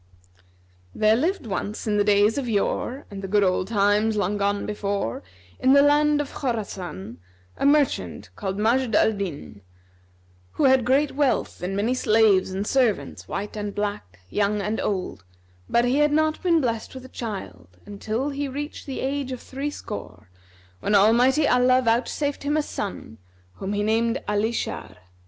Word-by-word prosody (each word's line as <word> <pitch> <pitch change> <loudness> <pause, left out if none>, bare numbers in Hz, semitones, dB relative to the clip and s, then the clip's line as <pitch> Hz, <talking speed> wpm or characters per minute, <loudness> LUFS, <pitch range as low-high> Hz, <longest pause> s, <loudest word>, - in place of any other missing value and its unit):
There 215 0 +4
lived 335 - -1
once 205 0 -4
in 210 -2 +1
the 205 - +4
days 205 +4 +3
of 250 -3 -4
yore 240 +5 -1
and 195 -1 -7
the 195 - -5
good 205 +1 +3
old 185 0 +1
times 210 +1 +2
long 205 0 0
gone 200 0 0
before, 200 - -2 0.4
in 260 +1 +4
the 280 0 +7
land 295 +1 +4
of 290 - -4
Khorasan, 185 - -4 0.4
a - - +1
merchant 290 -1 +1
called 195 -2 -4
Majd 230 +2 +1
al 220 - +4
Dнn, 175 - -6 0.9
who - - -1
had 265 -3 +5
great 275 +4 +2
wealth 285 -2 0
and 185 +2 -3
many 215 +5 +1
slaves 215 -6 +3
and 195 +2 -3
servants, 245 -4 0
white 205 +2 -5
and 205 -1 -4
black, 205 - -4
young 205 0 +1
and 210 +2 -2
old; 185 - -3 0.5
but 235 +1 +3
he 250 +3 +2
had 295 0 +3
not 310 +1 +1
been 340 -3 +3
blessed 230 -1 -3
with 260 0 -9
a - - -11
child 90 - -7
until 220 +6 -3
he 285 +1 -3
reached 290 +3 -6
the 270 - -4
age 275 0 -2
of 255 - -5
threescore, 220 - -7 0.5
when 205 - +1
Almighty 245 +8 +4
Allah 250 +1 +4
vouchsafed 255 +4 0
him 295 +2 0
a 305 - +1
son, 190 - -6 0.4
whom 195 +1 -4
he 205 0 0
named 230 +3 +1
Alн 210 +1 +1
Shбr. 225 - -4
220 Hz, 165 wpm, -24 LUFS, 200-265 Hz, 0.9 s, the